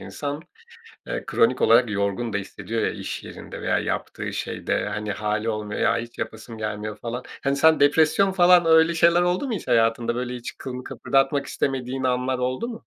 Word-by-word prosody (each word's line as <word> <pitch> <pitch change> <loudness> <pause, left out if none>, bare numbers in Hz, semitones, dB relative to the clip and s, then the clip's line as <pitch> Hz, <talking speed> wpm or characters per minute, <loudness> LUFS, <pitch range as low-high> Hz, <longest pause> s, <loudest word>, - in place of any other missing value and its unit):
insan, 145 +1 -5 0.6
eee, - - -3
kronik 125 +2 +2
olarak 115 0 +5
yorgun 100 +3 -1
da 100 - 0
hissediyor 110 +3 -4
ya - - +1
iş - - -6
yerinde - - -9
veya - - +1
yaptığı - - -4
şeyde. - - -2
Hani, 105 0 -3
hâli 105 +2 -2
olmuyor, 105 -1 -3
ya - - +3
hiç 120 +1 -8
yapasın 110 +1 -6
gelmiyor 105 0 -4
falan. 120 +3 -5 0.2
Hani, 140 0 +1
sen 160 +2 +4
depresyon 160 +6 +4
falan 180 -2 +5
öyle 160 +1 +5
şeyler 170 +1 +4
oldu 180 +9 0
mu - - -2
hiç 185 - -6
hayatında, 115 +1 +2
böyle, 125 0 -3
hiç 120 - -7
kılını 125 -1 -6
kıpırdatmak 135 +1 0
istemediğin 130 -1 -2
anlar 125 0 0
oldu 130 - -2
mu? 230 -1 -8
125 Hz, 180 wpm, -24 LUFS, 110-155 Hz, 0.6 s, olarak